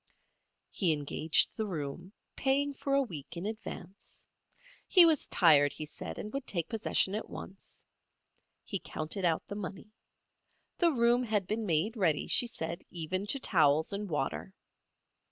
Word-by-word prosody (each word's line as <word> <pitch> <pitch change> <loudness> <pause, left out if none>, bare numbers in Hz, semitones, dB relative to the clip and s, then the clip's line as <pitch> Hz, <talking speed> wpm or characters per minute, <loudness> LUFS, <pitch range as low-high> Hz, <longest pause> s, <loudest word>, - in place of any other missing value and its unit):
He 175 -5 +2
engaged 150 +2 +1
the 220 -1 -1
room, 170 +1 -5 0.2
paying 280 +1 +1
for 275 0 -1
a 275 - +4
week 170 - -8
in 175 - -5
advance. 215 -2 -8 0.6
He 360 -3 +8
was 320 -4 +2
tired, 145 -5 +5
he 155 - -6
said, 150 - -6
and 210 - -6
would 275 -1 -4
take 170 -4 -1
possession 215 -3 0
at 215 - -4
once. 195 +1 -11 0.8
He 195 - -2
counted 165 +5 -3
out 165 -2 +1
the - - -6
money. 200 +1 -7 0.9
The 345 - +5
room 240 -2 +3
had 215 -5 0
been 215 +3 -2
made 175 +7 +1
ready, 170 -9 +1
she 245 - +2
said, 170 -6 -4
even 185 +4 -3
to 275 - +2
towels 160 - +2
and 200 0 -4
water. 155 +5 -3
195 Hz, 155 wpm, -31 LUFS, 160-225 Hz, 0.9 s, He